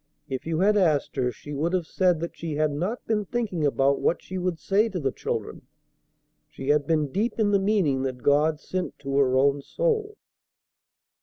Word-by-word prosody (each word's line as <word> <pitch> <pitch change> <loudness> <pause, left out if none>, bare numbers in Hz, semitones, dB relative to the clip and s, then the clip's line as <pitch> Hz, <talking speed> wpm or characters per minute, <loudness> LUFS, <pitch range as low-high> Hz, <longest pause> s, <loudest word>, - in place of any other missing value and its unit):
If 130 +2 -5
you 165 +1 0
had 210 +2 +4
asked 160 -7 +2
her, 125 -1 +1
she 145 +4 -10
would 160 +5 -1
have 180 -3 0
said 180 -1 +1
that 170 - -4
she 165 -3 -4
had 155 0 +1
not 180 +12 -3
been 215 -2 0
thinking 205 -7 -2
about 140 0 +2
what - - +1
she 185 0 -6
would 180 -2 -1
say 205 +6 +1
to 190 -4 -4
the 135 -4 0
children; - - -5 0.8
she 135 - -6
had 145 -1 +3
been 155 -4 +1
deep 215 - -1
in 215 -2 +2
the 200 - +4
meaning 190 -10 +1
that 130 -2 -4
God 150 +2 +3
sent 185 +3 -4
to 135 -1 -4
her 130 -2 +3
own 140 +1 +3
soul. 440 - -1
165 Hz, 200 wpm, -25 LUFS, 140-195 Hz, 0.8 s, had